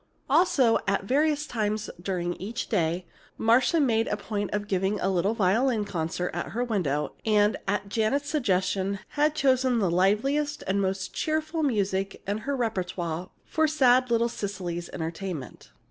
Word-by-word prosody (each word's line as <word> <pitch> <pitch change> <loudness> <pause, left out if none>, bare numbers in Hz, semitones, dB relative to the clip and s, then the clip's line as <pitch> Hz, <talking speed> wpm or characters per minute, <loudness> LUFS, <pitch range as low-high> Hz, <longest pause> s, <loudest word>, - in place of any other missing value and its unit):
Also, 275 -6 +4
at 195 - +1
various 295 +6 +1
times 215 -4 -2
during 175 -1 -2
each 225 +6 -5
day, 175 -4 0 0.3
Marcia 245 +8 +3
made 230 -6 +2
a 210 - -1
point 205 -2 -3
of 205 0 -2
giving 195 +1 0
a 195 - +1
little 190 +4 +1
violin 220 +3 +2
concert 175 -1 -2
at - - -4
her 240 +2 0
window, 155 - -1
and, 210 -1 +3
at 200 0 -1
Janet's 225 +8 0
suggestion, 195 -8 0
had 300 +1 +1
chosen 260 -3 +3
the 195 -6 +1
liveliest 270 - +1
and 195 +1 +1
most 190 -1 -2
cheerful 315 +1 -1
music 195 -8 -1
in 205 +2 -2
her 280 +5 -2
repertoire 180 -6 -2 0.2
for 315 0 +1
sad 255 -4 +4
little 235 0 +3
Cecily's 185 -6 -4
entertainment. 165 -3 -6
210 Hz, 150 wpm, -27 LUFS, 190-255 Hz, 0.3 s, Also